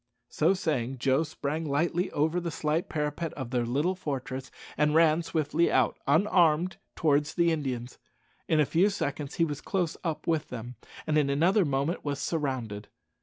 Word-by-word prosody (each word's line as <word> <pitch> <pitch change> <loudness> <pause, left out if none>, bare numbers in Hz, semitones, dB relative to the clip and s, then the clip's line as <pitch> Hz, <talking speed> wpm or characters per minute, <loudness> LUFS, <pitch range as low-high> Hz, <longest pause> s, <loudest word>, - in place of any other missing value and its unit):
So 165 +5 +2
saying, 135 -8 -1
Joe 135 +3 +2
sprang 155 0 -3
lightly 165 +4 0
over 155 +4 +1
the 170 -1 -3
slight 155 +1 -1
parapet 150 +1 -2
of 130 -4 -6
their 120 -2 0
little 145 +9 +1
fortress, 135 -6 -5 0.3
and 150 +1 +2
ran 160 0 +5
swiftly 160 0 0
out, 130 -3 +2
unarmed, 170 +1 +3 0.2
towards 150 -1 +1
the 170 -1 +3
Indians. 130 -6 -3 0.5
In 160 - +2
a 150 - +5
few 175 +8 +3
seconds 145 -7 -3
he 165 - +3
was 145 -3 -5
close 180 -5 -1
up 165 -4 -3
with 160 -2 0
them, 120 0 -7 0.3
and 155 -1 +2
in 140 -2 +1
another 175 +8 +3
moment 140 +4 -1
was 145 -1 -2
surrounded. 130 -10 -3
150 Hz, 170 wpm, -28 LUFS, 135-165 Hz, 0.5 s, ran